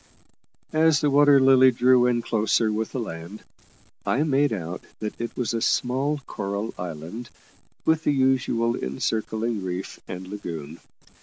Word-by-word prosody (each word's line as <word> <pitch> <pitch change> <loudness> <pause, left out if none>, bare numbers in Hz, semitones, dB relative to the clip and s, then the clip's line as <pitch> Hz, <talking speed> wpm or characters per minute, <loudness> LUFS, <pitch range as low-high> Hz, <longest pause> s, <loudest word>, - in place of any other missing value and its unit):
As 155 -2 +4
the 145 - +1
Water 145 0 +6
Lily 130 -1 +6
drew 125 0 +4
in 120 -1 +1
closer 110 0 +1
with 110 +1 -2
the 130 - -3
land, 85 -1 -7 0.6
I 140 - +1
made 145 -1 +2
out 90 -4 -4 0.2
that 105 -1 -4
it 115 - -5
was 120 -3 -1
a 115 - -1
small 135 +5 0
coral 100 +1 -4
island, 90 +7 -7 0.6
with 160 0 +2
the - - +4
usual 130 -4 +1
encircling 110 - -2
reef 90 +1 -5
and 90 0 -7
lagoon. 85 -6 -7
115 Hz, 145 wpm, -24 LUFS, 100-130 Hz, 0.6 s, Water